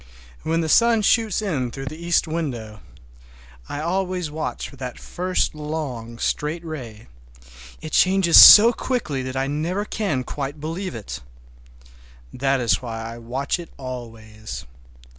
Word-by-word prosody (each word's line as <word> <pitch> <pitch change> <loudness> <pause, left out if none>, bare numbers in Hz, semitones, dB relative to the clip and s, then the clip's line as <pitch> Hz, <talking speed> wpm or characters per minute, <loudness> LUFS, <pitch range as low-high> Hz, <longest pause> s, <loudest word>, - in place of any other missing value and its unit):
When 165 +1 0
the 160 - -2
sun 230 +5 +4
shoots 215 -1 +2
in 140 -11 -1
through 135 +3 -7
the 155 +5 -8
east 170 -1 +1
window—I 65 - -8
always 180 -1 -2
watch 155 +1 -4
for - - -14
that 125 -2 -6
first 185 +1 -2
long, 145 -7 -5
straight 155 +7 -2
ray—it 60 - -11
changes 185 -1 +3
so 230 +3 +10
quickly 220 - -2
that 130 0 -5
I 135 - 0
never 165 +8 -2
can 195 -13 -2
quite 140 +3 -5
believe 165 +2 -5
it. 110 -3 -7 1.1
That 135 +1 0
is 115 -7 +1
why 115 -3 -6
I 120 - -10
watch 130 +8 -3
it 170 - -9
always. 115 -4 -8
140 Hz, 135 wpm, -22 LUFS, 115-170 Hz, 1.1 s, so